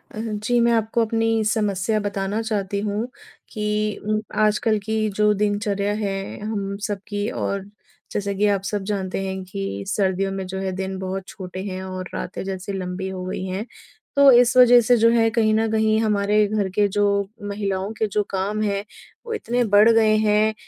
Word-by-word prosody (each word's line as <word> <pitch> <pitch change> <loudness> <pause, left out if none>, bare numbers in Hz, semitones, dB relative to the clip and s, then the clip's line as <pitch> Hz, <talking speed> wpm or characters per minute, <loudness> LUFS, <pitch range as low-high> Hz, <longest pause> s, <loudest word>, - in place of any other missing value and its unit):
अ, - - -5
जी 220 +2 -1
मैं 235 - +4
आपको 225 +1 +1
अपनी 225 0 +1
समस्या 215 -1 0
बताना 200 +1 -2
चाहती 205 -3 -2
हूँ 210 +3 -2 0.4
कि 210 -1 -1
उम, 215 +1 0 0.2
आजकल 215 +1 +2
की 220 0 0
जो 210 0 +3
दिनचर्या 205 -1 0
है 195 -1 -4
हम 200 -2 -3
सब 205 -2 -3
की 205 +1 -2
और 195 -4 -3 0.5
जैसा 200 -1 -2
कि 200 +2 +1
आप 200 -2 +1
सब 205 0 -2
जानते 190 -2 -2
हैं 190 0 -4
कि 100 - -5
सर्दियों 195 -1 0
में 195 -1 -4
जो 190 +1 -4
है 190 0 -2
दिन 190 0 -4
बहुत 190 0 -4
छोटे 185 0 -7
हैं 185 -2 -5
और 185 -1 -6
रातें - - -5
जैसे 190 +1 -5
लंबी 185 0 -4
हो 185 -1 -5
गई 185 - -4
हैं 190 +3 -3 0.5
तो 280 -1 +7
इस 245 0 +5
वज़ह 245 -1 +8
से 245 +2 +4
जो 230 +1 +5
है 230 -1 +3
कहीं 220 -1 +2
न 225 0 +1
कहीं 220 0 +2
हमारे 210 -1 +2
घर 205 -2 -1
के 205 -1 +4
जो 205 +1 +1 0.4
महिलाओं 200 -1 -2
के 220 - +2
जो 210 - +3
काम 200 +2 -2
हैं 200 -1 -1 0.4
वो 465 - -4
इतने 245 - 0
बढ़ 210 +2 +7
गए 220 -1 +4
हैं। 215 0 +3
205 Hz, 190 wpm, -22 LUFS, 195-220 Hz, 0.5 s, वज़ह